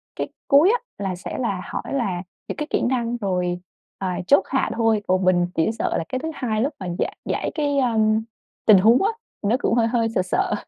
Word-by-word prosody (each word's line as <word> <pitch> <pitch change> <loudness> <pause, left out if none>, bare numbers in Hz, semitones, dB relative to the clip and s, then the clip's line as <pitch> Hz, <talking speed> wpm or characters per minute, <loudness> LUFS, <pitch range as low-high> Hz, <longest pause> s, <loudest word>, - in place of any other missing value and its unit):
cái - - -2 0.2
cuối 305 +8 +6
á, - - +1 0.3
là 185 -1 -1
sẽ 180 - -6
là 200 -7 -1
hỏi - - -5
là 195 -9 -1 0.2
những - - -4
cái 300 - -3
kỹ - - 0
năng, 240 -1 0
rồi, 180 -4 -1 0.4
à, 180 -2 -2
chốt 285 - +5
hạ 265 - +1
thôi, 225 -2 +2
còn 185 0 +2
mình 175 -1 +3
chỉ 160 - +2
sợ - - 0
là - - -1
cái 255 - -2
thứ 320 +4 -4
hai 220 -4 -1
lúc 285 +4 0
mà 185 - -5
giải - - -2
giải - - -2
cái, 290 -2 0
a, 240 -4 +1 0.7
tình 215 -3 +8
huống 225 +6 +5
á, 430 - +3 0.3
nó 215 +4 +2
cũng - - +2
hơi 230 -1 +3
hơi 230 -1 +1
sợ 200 - 0
sợ. 185 - 0
225 Hz, 225 wpm, -23 LUFS, 185-255 Hz, 0.7 s, tình